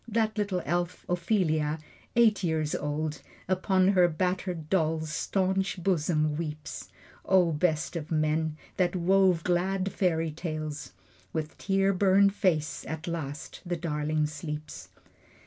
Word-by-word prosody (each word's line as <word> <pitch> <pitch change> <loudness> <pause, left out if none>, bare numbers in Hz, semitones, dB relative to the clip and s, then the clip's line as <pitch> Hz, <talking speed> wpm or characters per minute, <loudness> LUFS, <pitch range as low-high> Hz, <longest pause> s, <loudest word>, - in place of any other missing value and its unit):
That 220 -1 0
little 200 -4 -1
elf, 175 +3 -2
Ophelia, 170 -4 +1 0.4
eight 225 -4 +4
years 160 -3 0
old, 150 +1 -2 0.3
Upon 185 0 +3
her 180 -3 +5
battered 180 -1 -2
doll's 160 -3 0
staunch 190 +3 0
bosom 155 -4 +1
weeps. 155 -2 -5 0.3
("O 185 -3 +4
best 155 +1 0
of 155 -3 -4
men, 155 0 0 0.2
that 180 -1 +2
wove 185 -1 +3
glad 185 +2 0
fairy 165 -4 +1
tales.") 155 - -5 0.4
With 155 0 -3
tear 195 0 +2
burned 195 +1 +4
face, 165 -7 0
at 160 +1 -5
last 155 -4 -5
the 175 -2 -2
darling 155 -2 0
sleeps. 150 0 -6
170 Hz, 125 wpm, -28 LUFS, 155-190 Hz, 0.4 s, her